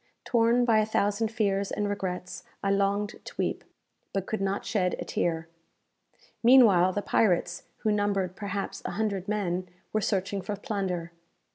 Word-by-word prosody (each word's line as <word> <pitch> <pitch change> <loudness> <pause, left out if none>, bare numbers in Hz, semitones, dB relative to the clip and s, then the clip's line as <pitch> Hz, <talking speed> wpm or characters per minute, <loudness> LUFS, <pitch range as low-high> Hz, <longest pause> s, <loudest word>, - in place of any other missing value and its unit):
Torn 235 +1 +3
by 225 -2 +4
a 215 - +3
thousand 210 +1 +1
fears 200 -3 0
and 205 - -1
regrets, 185 -3 -4 0.2
I 195 - +2
longed 200 +1 0
to - - -10
weep, - - -1 0.5
but 195 -1 -1
could 220 0 -3
not 195 +1 -1
shed 180 -4 +1
a - - -5
tear. 165 -1 -1 0.9
Meanwhile 220 -8 +6
the 205 - -2
pirates, 175 -4 +1 0.2
who 215 - +2
numbered, 200 -3 0
perhaps, 200 -1 -4
a - - -3
hundred 200 -3 -1
men, 185 -3 -1 0.2
were 215 - +1
searching 200 -1 -1
for 205 +3 -3
plunder. 195 -6 -3
200 Hz, 155 wpm, -28 LUFS, 185-215 Hz, 0.9 s, Meanwhile